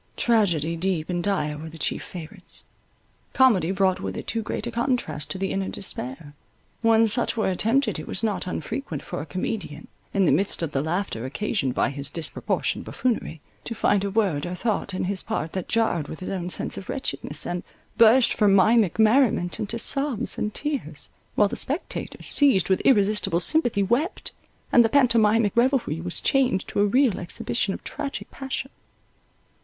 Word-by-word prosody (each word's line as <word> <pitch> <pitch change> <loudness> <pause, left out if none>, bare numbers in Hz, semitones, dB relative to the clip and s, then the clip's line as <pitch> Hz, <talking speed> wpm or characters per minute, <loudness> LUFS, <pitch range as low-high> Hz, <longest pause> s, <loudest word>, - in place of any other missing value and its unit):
Tragedies 170 -8 +1
deep 180 -2 -1
and 175 -1 -2
dire 150 -7 -1
were 160 +1 -7
the 165 - -11
chief 155 - -2
favourites. 180 +2 -10 0.7
Comedy 220 -11 +4
brought 190 -1 +1
with 95 -1 -5
it - - -6
too 230 - -2
great 220 - -4
a - - -4
contrast 235 - -1
to - - -3
the 195 0 -2
inner 195 0 -2
despair: 145 -4 -5 0.5
when 225 0 +4
such 230 +2 0
were 220 - +1
attempted, 225 - +1
it 155 - -8
was 190 - -2
not 210 -4 -1
unfrequent 220 - -4
for - - -5
a 155 - -8
comedian, 180 -2 -4 0.2
in 195 -2 +2
the - - +4
midst 195 -3 0
of 160 - -2
the 135 - 0
laughter 160 - -2
occasioned 135 - -2
by - - +1
his 140 0 -5
disporportioned 165 +2 -2
buffoonery, 225 - -2 0.2
to 230 - -5
find 200 -2 +2
a 200 - -1
word 190 -7 0
or 180 - -4
thought 200 -2 -2
in - - -2
his 190 +1 -1
part 155 +2 -3
that 185 -2 -4
jarred 220 -10 0
with 160 - -8
his 185 - -6
own 180 -2 -3
sense - - -4
of 190 - -13
wretchedness, 150 - 0
and 175 0 -3 0.4
burst 230 +2 +6
from 205 -3 +3
mimic 205 -1 +4
merriment 220 -5 +3
into 215 +2 -3
sobs 275 0 0
and 210 - -3
tears, 270 - -4 0.2
while 205 - +4
the - - -5
spectators, 290 +7 -2
seized 210 - +3
with 190 - +2
irresistible 205 -6 +3
sympathy, 240 - +3
wept, 245 - -1 0.4
and 240 - +7
the 225 - +2
pantomimic 230 -5 +3
revelry 235 - +1
was 175 0 -2
changed 255 -8 +1
to - - -3
a 205 - +4
real 250 -1 +2
exhibition 175 - -2
of - - -11
tragic 280 -1 -5
passion. 265 0 -4
200 Hz, 180 wpm, -24 LUFS, 170-230 Hz, 0.7 s, and